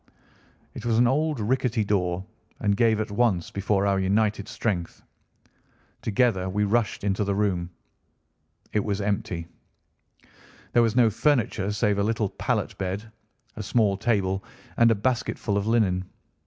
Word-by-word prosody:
It - - -8
was 115 -1 +1
an 120 - +5
old 150 +2 +1
rickety 125 0 +1
door 90 -2 0 0.3
and 100 -1 +1
gave 110 0 +3
at 110 0 -3
once 100 -5 +1
before 100 0 0
our 100 -1 +2
united 100 +1 +1
strength. 105 -6 -3 1.0
Together 100 -4 +1
we 105 +2 0
rushed 105 0 0
into 100 +1 0
the 100 -1 -1
room. 95 -4 0 1.0
It 105 - +1
was 100 -2 -2
empty. 100 -4 -2 1.3
There 120 - +5
was 115 -1 +2
no 120 -3 +5
furniture 115 -5 +1
save 105 0 +1
a - - +2
little 110 -1 0
pallet 95 - -2
bed, 100 +4 -4 0.4
a - - -5
small 105 -1 +2
table, 95 -2 0 0.3
and 115 0 +6
a 115 - +4
basketful 110 -1 -1
of 100 +1 0
linen. 95 -5 +2
105 Hz, 145 wpm, -25 LUFS, 100-115 Hz, 1.3 s, and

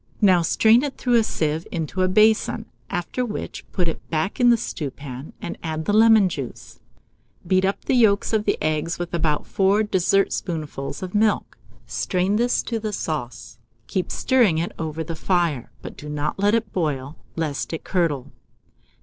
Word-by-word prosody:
Now 185 -5 +5
strain 220 +7 +4
it 285 -1 -4
through 245 - 0
a - - +2
sieve 160 -4 -1
into 165 +2 -2
a 185 - +3
basin, 215 +3 +3 0.2
after 175 +8 -2
which 220 -3 -5
put 180 -3 0
it 165 - -5
back 160 - -1
in 245 -1 +6
the 235 - +6
stewpan, 140 - -6
and - - -5
add 160 -1 -3
the 205 - +1
lemon 220 -2 +6
juice. 140 -8 -7 0.7
Beat 185 +2 +3
up 195 - -2
the - - +1
yolks 220 -4 +3
of 215 -1 +1
the - - +1
eggs 155 +2 0
with 175 -1 -5
about 155 -3 0
4 195 +2 +2
dessertspoonfuls 175 -7 -1
of 185 - -6
milk; 215 0 +1 0.3
strain 185 +3 0
this 240 +2 +1
to 230 -2 -2
the 215 -1 -4
sauce, 145 -10 -5 0.3
keep 185 - -2
stirring 240 -11 +3
it 165 +2 -1
over 160 0 -3
the 165 +1 -5
fire, 165 -7 0
but - - -8
do 150 - -8
not 150 +4 -3
let 205 +2 +3
it 225 -2 -2
boil, 145 -4 -2 0.2
lest 155 -4 -2
it 160 - -5
curdle. 165 -8 -1
180 Hz, 175 wpm, -23 LUFS, 155-210 Hz, 0.7 s, in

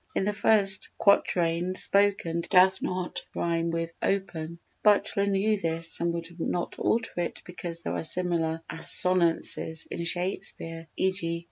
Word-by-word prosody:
In - - -1
the 210 - -1
first 200 -2 +3
quatrain 175 -2 +1
"spoken" 195 -5 +3
does 190 0 +4
not 180 -1 -5
rhyme 170 0 -2
with 165 0 -4
"open"; 170 -4 -3 0.2
Butler 200 -1 +3
knew 200 +1 0
this 165 -1 +1
and 170 0 -1
would 170 -1 -6
not 175 +1 -4
alter 225 0 -1
it 170 - -6
because 170 -1 -5
there - - -4
are - - -3
similar 165 -1 -1
assonances 165 -2 +3
in 170 - -5
Shakespeare, 170 -2 -3
_e.g. 180 -3 -2
175 Hz, 135 wpm, -26 LUFS, 165-195 Hz, 0.2 s, does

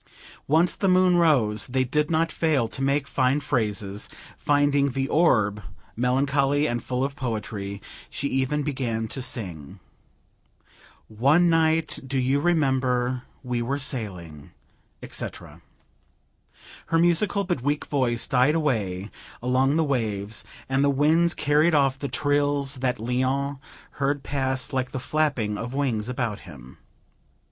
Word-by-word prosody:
Once 160 +4 +3
the 195 - 0
moon 185 -1 +4
rose; 125 -11 +2
they 130 0 +1
did 150 +4 0
not 165 0 +1
fail 150 -8 +1
to 130 - -6
make 140 +1 +1
fine 130 +1 +1
phrases, 105 -7 -2 0.3
finding 145 -1 +2
the 135 +1 -1
orb 110 -11 +2 0.3
melancholy 140 +3 +1
and 120 -3 -2
full 125 0 -2
of 140 0 -2
poetry. 105 -6 -4 0.3
She 140 - -3
even 135 +3 0
began 120 -6 -2
to 135 - -5
sing 90 - -5 1.3
"One 140 +11 +3
night, 160 -1 +2
do 135 +1 -1
you 130 +2 +2
remember, 130 -6 +1 0.2
we 125 -2 -2
were 135 +4 -1
sailing," 90 - -5 0.5
etc. - - -5 1.3
Her 165 - +2
musical 175 +4 +2
but 175 -9 -2
weak 145 +3 -1
voice 125 -5 0
died 135 +3 +3
away 105 - -1 0.3
along 130 +3 +2
the 160 - +3
waves, 110 -7 -2 0.2
and 135 +1 +1
the 140 - +3
winds 160 +5 +3
carried 150 +3 +3
off 135 -2 +2
the 140 - -4
trills 145 -1 0
that 125 -1 -1
Léon 130 +4 -1 0.3
heard 140 0 -1
pass 130 -1 -2
like 130 -1 -2
the 130 - -2
flapping 125 -8 -1
of 120 +3 -5
wings 125 -6 -1
about 120 -5 -2
him. 65 -8 -13
135 Hz, 135 wpm, -25 LUFS, 120-145 Hz, 1.3 s, moon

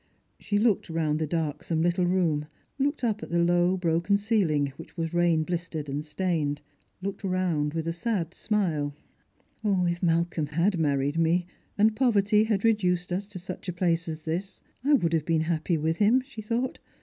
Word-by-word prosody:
" - - -45
She 205 - -1
looked 210 -4 +2
round 155 -2 0
the 155 - -1
darksome 160 0 -1
little 175 +1 +2
room 165 -5 +1
— - - -41
looked 285 +1 0
up 220 -3 0
at - - -7
the 170 - 0
low 175 +2 +3
broken 170 +3 +2
ceiling, 175 - +1
which 165 - -12
was 165 0 -2
rain 170 -2 +3
bKstered 170 -3 -3
and 140 +2 -3
stained 150 -2 -1 0.2
— - - -41
looked 200 0 -4
roimd 180 -6 0
with 165 0 -2
a - - +1
sad 180 -3 -2
smile. 160 -9 -1 0.4
" - - -39
If 180 -4 +1
Malcolm 165 -2 +1
had 170 +5 +1
married 145 0 +1
me, 170 +2 +2 0.3
and 215 +1 +4
poverty 215 -3 +3
had 210 -3 0
reduced 180 -5 +2
us 195 +2 -2
to 205 -2 -8 0.2
Buch 180 -1 -7
place 170 -2 +1
as 155 -1 -6
this, 180 +5 -3 0.2
I 290 +2 +3
would 170 -10 +1
have 160 -2 +1
been 165 -2 +2
happy 160 +1 0
with 160 +2 0
him," 220 +5 +4
she 265 -5 -9
thought. 235 +4 -2
175 Hz, 190 wpm, -27 LUFS, 160-200 Hz, 0.4 s, and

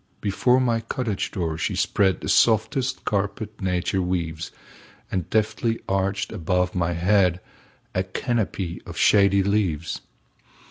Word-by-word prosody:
Before 125 +5 +2
my 120 -3 +2
cottage 115 -2 -3
door 80 -3 -3
she - - -1
spreadThe 95 -2 +1
softest 120 +4 +2
carpet 105 +1 -2
nature 95 0 0
weaves, 85 -3 -2 0.6
And 90 -3 -2
deftly 110 +1 0
arched 95 +1 -1
above 90 -2 0
my 85 -1 0
headA 90 +1 +3 0.7
canopy 105 -7 -2
of - - -8
shady 100 -1 +5
leaves. 95 -6 -1
95 Hz, 110 wpm, -24 LUFS, 90-110 Hz, 0.7 s, shady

